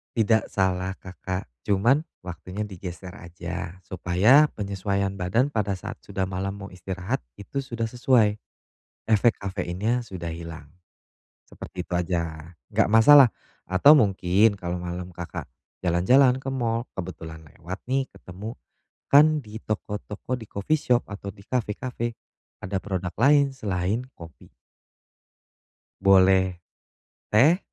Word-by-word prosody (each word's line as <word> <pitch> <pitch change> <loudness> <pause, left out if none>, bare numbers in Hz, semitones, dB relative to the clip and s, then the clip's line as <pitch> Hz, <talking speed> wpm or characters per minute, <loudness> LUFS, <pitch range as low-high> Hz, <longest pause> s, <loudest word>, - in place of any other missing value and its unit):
Tidak 110 -1 +2
salah 95 0 0
Kakak, 95 0 -6 0.2
cuman 115 +9 +3 0.2
waktunya 90 +3 -6
digeser 90 -2 -8
aja. 90 +1 -6
Supaya 95 - +4
penyesuaian 100 -1 -2
badan 110 +10 +1
pada 105 -4 0
saat 90 - -8
sudah 95 - -3
malam 95 +1 -3
mau 100 0 -8
istirahat 90 0 -4 0.2
itu 120 +7 -5
sudah 115 -3 -3
sesuai, 120 -4 +3 0.7
efek 110 +1 +4
kafeinnya 100 +5 -2
sudah 90 -6 -6
hilang, 80 -3 -8 0.8
seperti 90 - -8
itu - - -6
aja. 85 -2 -3 0.2
Enggak - - +2
masalah 130 +4 +8 0.4
atau 95 +11 +7
mungkin 100 -1 +3
kalau 90 0 -3
malam 90 +1 -5
Kakak 85 -1 -6 0.3
jalan-jalan 125 +10 +4
ke 135 - -3
mall 115 -2 -1
kebetulan 80 -3 -7
lewat 90 +5 -8
nih 135 +1 +1
ketemu, 100 +5 -8 0.6
kan 150 +2 +6
di 110 -3 -9
toko-toko 105 +3 -4
di 110 - -9
coffee 100 +11 -1
shop 125 -3 +2
atau 100 -1 -7
di - - -16
kafe-kafe 120 0 -3 0.5
ada 95 +1 -2
produk 95 -3 -3
lain 140 +2 +4
selain 100 +1 -2
kopi. 85 -2 -14 1.5
Boleh, 95 -2 +4 0.7
teh, 145 - +5
100 Hz, 120 wpm, -25 LUFS, 90-115 Hz, 1.5 s, masalah